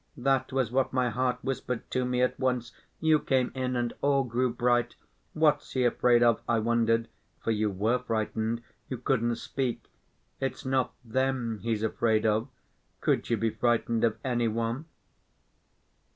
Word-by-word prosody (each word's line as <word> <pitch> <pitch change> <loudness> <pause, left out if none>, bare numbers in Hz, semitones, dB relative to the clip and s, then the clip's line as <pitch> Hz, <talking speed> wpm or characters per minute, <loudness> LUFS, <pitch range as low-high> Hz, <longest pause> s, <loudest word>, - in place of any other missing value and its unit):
That 135 +1 +1
was 130 -4 0
what 130 +1 +1
my 125 -2 +1
heart 125 0 0
whispered 125 -2 -3
to 130 - +1
me 125 0 +1
at 125 - 0
once. 125 -2 0 0.3
You 160 -1 +4
came 130 -3 +1
in 130 -1 -2
and 120 -1 -1
all 140 -1 +3
grew 125 0 0
bright. 120 0 +1 0.4
What's 150 -2 +2
he 130 -1 +2
afraid 120 0 +4
of? 115 -2 +4
I 120 - +3
wondered. 115 0 +2 0.4
For 115 - +1
you 105 -1 +1
were 110 +6 +1
frightened; 115 0 -2 0.3
you 130 - -3
couldn't 120 -1 +1
speak. 125 +1 -4 0.5
It's 135 0 -3
not 130 -1 0
them 125 -2 -1
he's 110 -1 -1
afraid 110 0 +1
of—could 110 +4 -2
you 115 - +2
be 115 +1 0
frightened 115 -1 +1
of 115 -2 +2
any 120 -2 +1
one? 115 +6 -2
120 Hz, 155 wpm, -28 LUFS, 115-130 Hz, 0.5 s, You